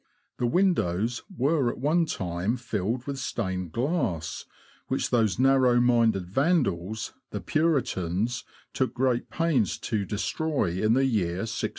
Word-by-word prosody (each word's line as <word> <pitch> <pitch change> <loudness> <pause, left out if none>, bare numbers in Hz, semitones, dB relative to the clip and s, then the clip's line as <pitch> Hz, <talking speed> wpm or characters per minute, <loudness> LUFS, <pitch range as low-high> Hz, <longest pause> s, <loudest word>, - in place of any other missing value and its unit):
The 120 - +1
windows 120 - +1 0.2
were 140 -2 +2
at - - -5
one 160 +6 +2
time 90 - -2
filled 115 +1 -2
with 140 -1 -4
stained 95 - -3
glass, 120 - -1 0.4
which - - -1
those 110 -6 +2
narrow 130 -1 +4
minded 115 -6 +3
Vandals, 110 - 0 0.2
the 105 - -4
Puritans, 120 - 0 0.3
took - - -1
great 125 -1 0
pains 160 - +1
to 110 -3 -2
destroy 110 - -1
in 110 +1 +4
the 135 +1 +3
year 95 -8 0
1643. 110 - -2
120 Hz, 130 wpm, -27 LUFS, 95-135 Hz, 0.4 s, narrow